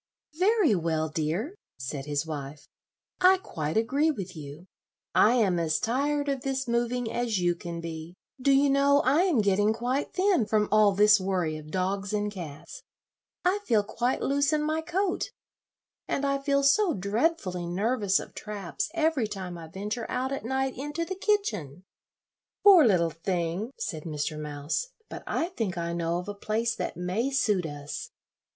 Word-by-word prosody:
"Very 400 Hz, -, +4 dB
well, 160 Hz, -3 st, 0 dB
dear," 165 Hz, -, -2 dB, 0.2 s
said 135 Hz, +2 st, -5 dB
his 145 Hz, +1 st, -1 dB
wife, 145 Hz, -2 st, -7 dB, 0.5 s
"I 370 Hz, +1 st, +6 dB
quite 155 Hz, -, -4 dB
agree 275 Hz, +8 st, +2 dB
with 195 Hz, -, -4 dB
you. 150 Hz, +2 st, -9 dB, 0.5 s
I 230 Hz, +4 st, +5 dB
am 195 Hz, -8 st, +2 dB
as 155 Hz, -2 st, +1 dB
tired 285 Hz, +5 st, 0 dB
of 275 Hz, -2 st, -1 dB
this 265 Hz, 0 st, -2 dB
moving 235 Hz, 0 st, 0 dB
as 240 Hz, -3 st, 0 dB
you 175 Hz, -1 st, +2 dB
can 170 Hz, -1 st, -6 dB
be. 165 Hz, +1 st, -7 dB, 0.3 s
Do 275 Hz, -, +3 dB
you 275 Hz, +1 st, +4 dB
know, 280 Hz, +1 st, +4 dB
I 280 Hz, +6 st, +4 dB
am 315 Hz, -, +3 dB
getting 205 Hz, +1 st, +3 dB
quite 245 Hz, +5 st, -2 dB
thin 370 Hz, -, +2 dB
from 215 Hz, -1 st, +2 dB
all 210 Hz, -1 st, +5 dB
this 210 Hz, +1 st, +6 dB
worry 185 Hz, -4 st, -1 dB
of 155 Hz, 0 st, -9 dB
dogs 195 Hz, +3 st, -2 dB
and 210 Hz, 0 st, 0 dB
cats. 160 Hz, -7 st, -8 dB, 0.6 s
I 375 Hz, +3 st, +3 dB
feel 215 Hz, -3 st, +3 dB
quite 240 Hz, +5 st, -1 dB
loose 280 Hz, +1 st, +2 dB
in 305 Hz, -1 st, +1 dB
my 310 Hz, +1 st, 0 dB
coat, 360 Hz, +3 st, -1 dB, 0.8 s
and 280 Hz, -, -1 dB
I 275 Hz, 0 st, +1 dB
feel 280 Hz, 0 st, +1 dB
so 330 Hz, +4 st, +4 dB
dreadfully 200 Hz, -, -1 dB
nervous 200 Hz, +2 st, +1 dB
of -, -, -9 dB
traps 205 Hz, -, -4 dB
every 315 Hz, -8 st, +1 dB
time 190 Hz, -4 st, -6 dB
I 165 Hz, -1 st, -9 dB
venture 210 Hz, +7 st, -5 dB
out 260 Hz, +1 st, -1 dB
at 275 Hz, -, -3 dB
night 265 Hz, +2 st, -1 dB
into 295 Hz, +5 st, -3 dB
the 380 Hz, -, -4 dB
kitchen." 215 Hz, -, -1 dB, 0.8 s
"Poor 390 Hz, -6 st, +9 dB
little 170 Hz, -5 st, +3 dB
thing!" 175 Hz, +4 st, -2 dB
said 160 Hz, -5 st, -4 dB
Mr. 155 Hz, -1 st, -3 dB
Mouse; 150 Hz, -, -3 dB, 0.2 s
"but -, -, -7 dB
I 335 Hz, -, -1 dB
think 220 Hz, -, -3 dB
I 170 Hz, 0 st, -2 dB
know 170 Hz, 0 st, -1 dB
of 180 Hz, -, -5 dB
a 205 Hz, -, -3 dB
place 220 Hz, +3 st, -1 dB
that -, -, -4 dB
may 185 Hz, +9 st, -1 dB
suit 210 Hz, -10 st, +1 dB
us. 145 Hz, -1 st, -6 dB
210 Hz, 170 wpm, -28 LUFS, 170-275 Hz, 0.8 s, Poor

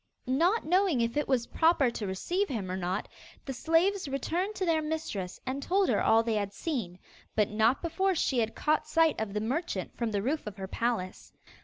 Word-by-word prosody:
Not 335 Hz, -, +2 dB
knowing 360 Hz, -4 st, +3 dB
if 230 Hz, 0 st, 0 dB
it 295 Hz, -, 0 dB
was 255 Hz, -3 st, +1 dB
proper 320 Hz, -5 st, +3 dB
to 215 Hz, -3 st, -4 dB
receive 350 Hz, -, -1 dB
him 200 Hz, -8 st, -3 dB
or -, -, -2 dB
not, 185 Hz, +2 st, -2 dB, 0.4 s
the 270 Hz, -, -4 dB
slaves 330 Hz, +7 st, +2 dB
returned 345 Hz, +9 st, -2 dB
to 375 Hz, -, -1 dB
their 325 Hz, -2 st, +2 dB
mistress 305 Hz, -, -4 dB
and 265 Hz, +2 st, -3 dB
told 380 Hz, +5 st, +2 dB
her -, -, +2 dB
all 225 Hz, +1 st, +4 dB
they 230 Hz, -1 st, -1 dB
had 205 Hz, -2 st, -1 dB
seen, 210 Hz, -, -3 dB, 0.4 s
but 210 Hz, -1 st, +2 dB
not 225 Hz, +7 st, +2 dB
before 375 Hz, +3 st, +1 dB
she 270 Hz, -5 st, +1 dB
had 225 Hz, -1 st, -1 dB
caught 305 Hz, 0 st, +1 dB
sight 320 Hz, -4 st, +3 dB
of 210 Hz, -2 st, -4 dB
the -, -, +1 dB
merchant 245 Hz, -, -2 dB
from 235 Hz, -2 st, -1 dB
the 200 Hz, -2 st, -1 dB
roof 285 Hz, +1 st, -1 dB
of 210 Hz, -1 st, -6 dB
her 190 Hz, -1 st, -5 dB
palace. 225 Hz, -4 st, -3 dB
265 Hz, 205 wpm, -29 LUFS, 215-330 Hz, 0.4 s, all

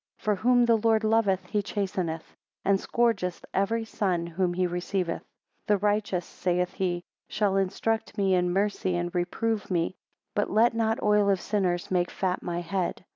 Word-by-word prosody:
For 210 Hz, -, 0 dB
whom 245 Hz, +4 st, +3 dB
the 230 Hz, -1 st, +4 dB
Lord 220 Hz, 0 st, +2 dB
loveth 210 Hz, -4 st, +2 dB
he 205 Hz, +3 st, 0 dB
chasteneth, 185 Hz, -5 st, -3 dB, 0.3 s
and 195 Hz, 0 st, +3 dB
scourgeth 200 Hz, -8 st, 0 dB
every 225 Hz, +4 st, +1 dB
son 185 Hz, -6 st, -1 dB
whom 175 Hz, +1 st, -1 dB
he 185 Hz, 0 st, +2 dB
receiveth. 180 Hz, 0 st, -2 dB
6 -, -, -31 dB, 0.4 s
The 210 Hz, -, +4 dB
righteous, 205 Hz, -3 st, 0 dB
saith 180 Hz, 0 st, -1 dB
he, 175 Hz, -2 st, -1 dB, 0.3 s
shall 205 Hz, -2 st, +1 dB
instruct 210 Hz, +3 st, -1 dB
me 195 Hz, -2 st, +2 dB
in 180 Hz, -1 st, +2 dB
mercy 195 Hz, -1 st, 0 dB
and 175 Hz, 0 st, -2 dB
reprove 210 Hz, +5 st, -1 dB
me; 175 Hz, -1 st, 0 dB, 0.4 s
but 205 Hz, -, 0 dB
let 225 Hz, +3 st, +4 dB
not 225 Hz, -1 st, 0 dB
oil 210 Hz, -1 st, +4 dB
of 195 Hz, -2 st, +3 dB
sinners 180 Hz, -4 st, -1 dB
make 180 Hz, -1 st, +2 dB
fat 185 Hz, -1 st, -1 dB
my 175 Hz, 0 st, -3 dB
head. 180 Hz, +1 st, -2 dB
195 Hz, 170 wpm, -27 LUFS, 180-210 Hz, 0.4 s, the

